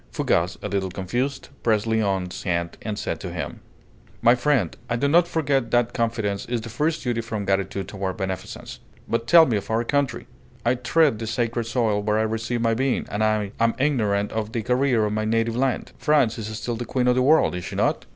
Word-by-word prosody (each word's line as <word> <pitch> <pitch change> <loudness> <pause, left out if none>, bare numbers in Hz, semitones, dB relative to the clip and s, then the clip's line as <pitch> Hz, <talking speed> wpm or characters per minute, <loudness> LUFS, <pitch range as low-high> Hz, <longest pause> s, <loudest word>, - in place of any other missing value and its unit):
Fougas, 85 +3 0
a - - -1
little 100 -1 -1
confused, 125 +10 -3
pressed 110 -2 +2
Léon's 100 -5 -1
hand 85 -2 -1
and 105 -2 -4
said - - -3
to - - -6
him: - - -5 0.6
"My 120 - +7
friend, 125 - +1
I 115 - +1
do 135 +5 +1
not 170 +4 +4
forget 140 -7 0
that 120 0 +2
Confidence 110 -4 -1
is 120 -1 -1
the 115 - -7
first 150 +8 -1
duty 120 -2 -1
from 110 -3 -4
Gratitude 95 0 -1
toward 95 -2 -4
Beneficence. 95 -2 -5 0.3
But 115 0 -1
tell 165 +2 +8
me 115 -7 +1
of 100 - -6
our 110 +1 +1
country! 140 +2 -1 0.4
I 120 - +4
tread 130 0 +2
the 115 - -4
sacred 115 +1 -1
soil 115 -3 +1
where 105 +1 +1
I 110 - +2
received 115 +2 -2
my 115 -1 +3
being, 130 +2 0
and 105 +2 0
I 110 -2 +1
am 115 0 +2
ignorant 105 -8 +1
of 110 0 -3
the 115 - -2
career 125 -2 +2
of 105 - -1
my 110 0 -1
native 115 +1 +1
land. 130 +1 -1
France 140 -7 +2
is 105 - -4
still 120 +1 -3
the 120 - -4
queen 125 +2 0
of 125 - +5
the 130 - +2
world, 150 +5 +4
is 90 0 -5
she 100 0 -6
not?" - - 0
115 Hz, 215 wpm, -24 LUFS, 105-125 Hz, 0.6 s, tell